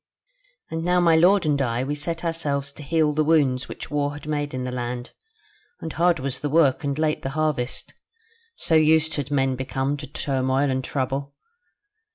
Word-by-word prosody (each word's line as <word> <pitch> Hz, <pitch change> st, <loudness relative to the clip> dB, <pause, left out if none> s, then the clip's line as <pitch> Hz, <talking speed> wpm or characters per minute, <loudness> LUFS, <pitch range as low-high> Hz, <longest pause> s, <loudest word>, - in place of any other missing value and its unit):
"And 160 Hz, 0 st, -3 dB
now 180 Hz, +1 st, +3 dB
my 170 Hz, -2 st, +5 dB
lord 180 Hz, +3 st, +5 dB
and 145 Hz, -2 st, +1 dB
I, 120 Hz, -1 st, 0 dB
we 140 Hz, +2 st, -2 dB
set 165 Hz, +4 st, -3 dB
ourselves 140 Hz, -4 st, -2 dB
to -, -, -12 dB
heal 155 Hz, +1 st, +1 dB
the 155 Hz, +1 st, +2 dB
wounds 145 Hz, -5 st, +2 dB
which -, -, -8 dB
war 145 Hz, -1 st, 0 dB
had 145 Hz, +1 st, -10 dB
made 145 Hz, -1 st, -2 dB
in 130 Hz, -, -3 dB
the 125 Hz, -, -3 dB
land: 120 Hz, 0 st, -4 dB, 0.7 s
and 160 Hz, -, -6 dB
hard 175 Hz, +1 st, +3 dB
was 135 Hz, -1 st, -3 dB
the 145 Hz, -, -2 dB
work, 150 Hz, -2 st, +3 dB
and 140 Hz, 0 st, -1 dB
late 155 Hz, -1 st, 0 dB
the 135 Hz, -, -3 dB
harvest; 150 Hz, -6 st, -1 dB, 0.6 s
so -, -, -1 dB
used 160 Hz, 0 st, +4 dB
had 140 Hz, -1 st, -3 dB
men 135 Hz, -2 st, +1 dB
become 135 Hz, +2 st, -2 dB
to -, -, -6 dB
turmoil 135 Hz, 0 st, 0 dB
and 130 Hz, 0 st, -1 dB
trouble. 140 Hz, +1 st, -3 dB
145 Hz, 190 wpm, -24 LUFS, 135-160 Hz, 0.7 s, my